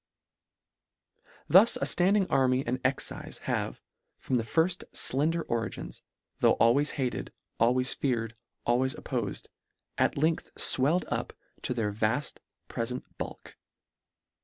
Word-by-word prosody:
Thus -, -, +7 dB
a -, -, -5 dB
ffanding 195 Hz, +2 st, +3 dB
army 130 Hz, 0 st, +2 dB
and 125 Hz, +2 st, -2 dB
excife 130 Hz, +1 st, -2 dB
have, -, -, -3 dB, 0.3 s
from 130 Hz, -, -1 dB
the 115 Hz, -, 0 dB
firfl 165 Hz, +10 st, +1 dB
flender 160 Hz, +5 st, +2 dB
origins, 115 Hz, -1 st, -4 dB, 0.4 s
tho' -, -, +5 dB
always 135 Hz, +6 st, +3 dB
hated, 130 Hz, -3 st, -2 dB, 0.3 s
always 125 Hz, +2 st, +3 dB
feared, 115 Hz, -4 st, -2 dB, 0.3 s
always 130 Hz, +3 st, +1 dB
oppofed, 120 Hz, -9 st, -4 dB, 0.5 s
at -, -, +2 dB
length 160 Hz, +3 st, 0 dB
fwelled 150 Hz, +8 st, +3 dB
up -, -, -3 dB, 0.3 s
to 125 Hz, -, -2 dB
their 110 Hz, -3 st, -1 dB
vaft 110 Hz, +7 st, 0 dB, 0.3 s
prefent 125 Hz, +2 st, -3 dB, 0.2 s
bulk. -, -, -7 dB
130 Hz, 115 wpm, -29 LUFS, 120-145 Hz, 0.5 s, Thus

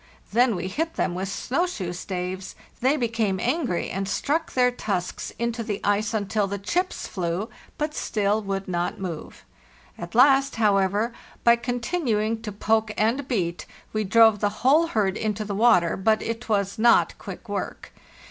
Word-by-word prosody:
Then 240 Hz, -1 st, +4 dB
we 180 Hz, +1 st, -3 dB
hit 320 Hz, -, -2 dB
them 175 Hz, -, 0 dB
with 190 Hz, +2 st, -3 dB
snow 275 Hz, -, -1 dB
shoe 185 Hz, -, -4 dB
staves; 185 Hz, +1 st, -5 dB, 0.2 s
they 265 Hz, +5 st, +2 dB
became 225 Hz, -6 st, 0 dB
angry, 250 Hz, -, -1 dB
and 195 Hz, +1 st, -3 dB
struck 305 Hz, -, -1 dB
their 250 Hz, -1 st, +4 dB
tusks 195 Hz, -7 st, -3 dB
into 235 Hz, +1 st, -2 dB
the 210 Hz, -3 st, -3 dB
ice 205 Hz, +1 st, +1 dB
until 210 Hz, -1 st, 0 dB
the 200 Hz, +1 st, -3 dB
chips 350 Hz, -, -2 dB
flew, 180 Hz, +3 st, -3 dB, 0.3 s
but 300 Hz, 0 st, -2 dB
still 210 Hz, -5 st, 0 dB
would 195 Hz, -1 st, -3 dB
not 175 Hz, -1 st, -2 dB
move. 175 Hz, -5 st, -7 dB, 0.5 s
At 170 Hz, +3 st, -7 dB
last, 270 Hz, +2 st, +5 dB
however, 205 Hz, +1 st, +2 dB, 0.3 s
by 235 Hz, 0 st, +7 dB
continuing 235 Hz, -2 st, -1 dB
to 220 Hz, -2 st, -5 dB
poke 220 Hz, +1 st, +1 dB
and 240 Hz, +6 st, +1 dB
beat, 180 Hz, -9 st, -2 dB, 0.3 s
we 215 Hz, 0 st, 0 dB
drove 220 Hz, +1 st, +5 dB
the 205 Hz, -, +2 dB, 0.2 s
whole 310 Hz, +5 st, +5 dB
herd 210 Hz, -, 0 dB
into 215 Hz, -1 st, -2 dB
the 205 Hz, -, -4 dB
water, 190 Hz, -6 st, +4 dB
but 215 Hz, +3 st, +2 dB
it 230 Hz, +1 st, -5 dB
was 200 Hz, 0 st, 0 dB
not 235 Hz, +1 st, +4 dB
quick -, -, -9 dB
work. -, -, -5 dB
215 Hz, 165 wpm, -25 LUFS, 195-240 Hz, 0.5 s, by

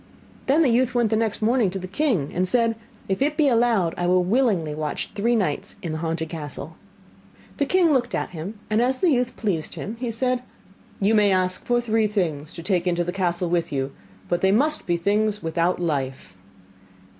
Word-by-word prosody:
Then 295 Hz, +5 st, +4 dB
the 275 Hz, -, +3 dB
youth 250 Hz, +1 st, +2 dB
went 235 Hz, -3 st, +2 dB
next 220 Hz, -1 st, -1 dB
morning 230 Hz, -2 st, +3 dB
to 190 Hz, -, -4 dB
the 185 Hz, -1 st, -6 dB
king, 195 Hz, -, 0 dB
and 185 Hz, +1 st, 0 dB
said: 230 Hz, +2 st, +2 dB, 0.3 s
'If 190 Hz, +4 st, -2 dB
it 295 Hz, +2 st, +1 dB
be 305 Hz, -, +4 dB
allowed, 230 Hz, -8 st, +2 dB
I 175 Hz, -, 0 dB
will 180 Hz, 0 st, +3 dB
willingly 190 Hz, -, +1 dB
watch 150 Hz, -1 st, -4 dB
three 235 Hz, +4 st, +1 dB
nights 205 Hz, -5 st, -1 dB
in 170 Hz, -, -3 dB
the 155 Hz, -, -3 dB
haunted 160 Hz, 0 st, -2 dB
castle.' 155 Hz, -1 st, -7 dB, 0.8 s
The 285 Hz, -, 0 dB
king 350 Hz, -3 st, +4 dB
looked 245 Hz, -3 st, 0 dB
at -, -, -3 dB
him, 180 Hz, +6 st, -6 dB
and 215 Hz, +2 st, +2 dB
as 255 Hz, +2 st, +2 dB
the 345 Hz, +4 st, +3 dB
youth 250 Hz, -2 st, 0 dB
pleased 185 Hz, -8 st, -2 dB
him, 220 Hz, +3 st, -6 dB
he 245 Hz, -1 st, -2 dB
said: 250 Hz, +2 st, 0 dB, 0.6 s
'You 205 Hz, +2 st, +2 dB
may 210 Hz, -2 st, +4 dB
ask 185 Hz, -1 st, 0 dB
for 240 Hz, 0 st, +2 dB
three 225 Hz, -2 st, +1 dB
things 165 Hz, -7 st, -2 dB
to 170 Hz, -, -8 dB
take 180 Hz, -1 st, 0 dB
into 175 Hz, -1 st, +1 dB
the 175 Hz, -, -3 dB
castle 175 Hz, -2 st, -1 dB
with 170 Hz, -2 st, 0 dB
you, 135 Hz, -1 st, -2 dB, 0.4 s
but 175 Hz, 0 st, 0 dB
they 190 Hz, -, +4 dB
must 295 Hz, +9 st, +2 dB
be 175 Hz, -1 st, +2 dB
things 210 Hz, +3 st, 0 dB
without 170 Hz, +2 st, 0 dB
life. 135 Hz, -, -3 dB
200 Hz, 200 wpm, -23 LUFS, 170-240 Hz, 0.8 s, Then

